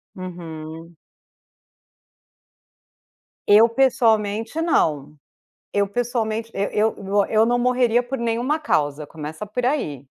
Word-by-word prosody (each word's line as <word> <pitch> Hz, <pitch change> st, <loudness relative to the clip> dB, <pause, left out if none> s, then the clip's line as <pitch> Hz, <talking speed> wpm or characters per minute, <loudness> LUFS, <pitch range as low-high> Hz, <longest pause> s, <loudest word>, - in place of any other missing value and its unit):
Uhum. 165 Hz, -2 st, -8 dB, 2.5 s
Eu, 215 Hz, +3 st, +7 dB
pessoalmente, 230 Hz, 0 st, +1 dB
não. 150 Hz, -, 0 dB, 0.6 s
Eu, 200 Hz, -1 st, +2 dB
pessoalmente 230 Hz, 0 st, -2 dB
e 200 Hz, +1 st, -1 dB
eu 220 Hz, +1 st, +2 dB, 0.3 s
eu 220 Hz, 0 st, +4 dB
não 245 Hz, +1 st, +1 dB
morreria 245 Hz, -1 st, +2 dB
por 250 Hz, +2 st, -5 dB
nenhuma 235 Hz, +5 st, 0 dB
causa, 150 Hz, -, -1 dB
começa 155 Hz, +5 st, -7 dB
por 240 Hz, +4 st, -3 dB
aí. 150 Hz, -, -2 dB
220 Hz, 100 wpm, -22 LUFS, 165-245 Hz, 2.5 s, Eu